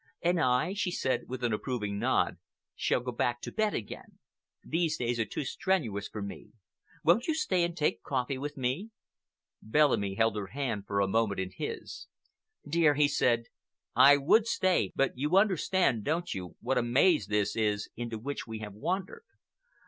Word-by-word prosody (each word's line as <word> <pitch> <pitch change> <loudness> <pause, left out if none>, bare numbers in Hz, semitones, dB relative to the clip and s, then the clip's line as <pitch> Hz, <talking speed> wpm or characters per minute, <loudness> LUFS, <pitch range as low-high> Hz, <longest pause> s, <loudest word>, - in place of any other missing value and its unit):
"And 175 0 +2
I," 130 +5 +2
she 205 -2 -1
said, 135 -7 -1
with 130 0 -5
an 120 -2 +1
approving 105 -3 -3
nod, - - +1 0.4
"shall - - +1
go 125 +1 -4
back 120 0 -1
to - - -6
bed 215 -1 0
again. 105 - -7 0.5
These 165 -1 0
days 120 -1 -1
are 115 - +1
too 140 - -4
strenuous 130 - -1
for 105 - -6
me. 100 - -9 0.5
Won't 180 +9 +3
you 320 - +1
stay 185 - +1
and 170 0 -2
take 150 - +1
your 95 - -18
coffee 130 0 -1
with 145 +1 -5
me?" 130 - -2 0.7
Bellamy 110 -6 +2
held 115 0 +2
her 100 -2 -4
hand 115 -3 -3
for 100 0 0
a 100 - +2
moment 105 -1 +1
in 95 0 -3
his. - - -6 0.6
"Dear," 155 -1 +3
he 145 0 +4
said, 120 -4 +2 0.5
"I 145 +1 +8
would 210 +11 +4
stay, 185 -5 +1
but 135 - +1
you 150 +7 +2
understand, 185 - +2
don't 170 +6 -1
you, 90 -2 -7
what 135 - +1
a - - +2
maze 135 +8 +3
this 105 0 0
is 105 -2 0
into 120 -1 -4
which 140 +5 -5
we 110 -1 -5
have 105 -2 -7
wandered. 185 - -3
130 Hz, 180 wpm, -30 LUFS, 110-170 Hz, 0.7 s, I